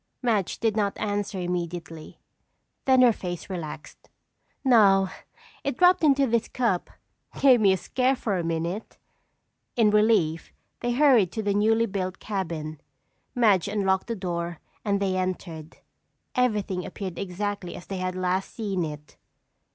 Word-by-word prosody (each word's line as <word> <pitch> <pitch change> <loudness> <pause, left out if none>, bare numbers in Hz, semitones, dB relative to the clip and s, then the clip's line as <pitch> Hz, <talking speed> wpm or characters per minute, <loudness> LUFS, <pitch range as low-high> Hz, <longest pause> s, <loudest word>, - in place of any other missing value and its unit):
Madge 215 -7 0
did 225 -2 +1
not 205 -2 0
answer 205 -1 -2
immediately. 175 -2 -5 0.7
Then 260 -1 +5
her 240 -2 +6
face 175 -1 -6
relaxed. 155 -4 -7 0.6
"No, 195 -6 +5 0.5
it 275 -3 -2
dropped 360 -1 +5
into 280 -2 +4
this 235 -2 0
cup. 230 -9 -1 0.5
Gave 255 -4 +6
me 200 -2 +5
a 190 - +2
scare 255 +6 +1
for 215 -5 -2
a - - -2
minute." 170 +5 -3 0.8
In 220 -3 +4
relief, 210 -7 +2 0.3
they 240 0 -1
hurried 245 - +4
to 220 - -3
the 200 -1 +1
newly 225 +3 +3
built 190 -2 -3
cabin. 160 -7 -4 0.5
Madge 210 -8 +3
unlocked 195 -2 0
the 230 - -2
door 170 -3 -4 0.2
and 200 -2 +1
they 195 -2 0
entered. 175 -4 -4 0.6
Everything 210 -7 0
appeared 185 -2 -6
exactly 200 0 -4
as 175 - -10
they 195 - -5
had 185 0 -3
last 185 +1 -1
seen 200 -6 -2
it. 150 -1 -8
195 Hz, 145 wpm, -26 LUFS, 180-225 Hz, 0.8 s, her